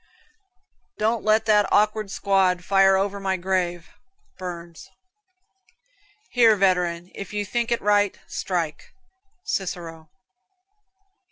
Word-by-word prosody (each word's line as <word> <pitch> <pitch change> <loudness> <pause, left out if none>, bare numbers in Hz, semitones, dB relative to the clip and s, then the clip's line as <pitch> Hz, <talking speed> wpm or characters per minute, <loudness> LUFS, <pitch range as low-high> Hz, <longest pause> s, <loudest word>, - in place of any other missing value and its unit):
"Don't 220 +2 0
let 215 +1 +3
that 210 -2 +3
awkward 215 0 +2
squad 190 -3 +1
fire 195 -1 +4
over 200 +1 -1
my 190 -1 -1
grave." 175 -2 -2 0.5
Burns. 170 -2 -8 1.4
"Here, 230 -3 +5
veteran, 180 -3 0
if 195 0 -8
you 205 0 -2
think 235 +3 -2
it 235 - +2
right, 205 -1 +2
strike." 170 -5 -4 0.5
Cicero. 165 -4 -4
195 Hz, 100 wpm, -23 LUFS, 175-210 Hz, 1.4 s, Here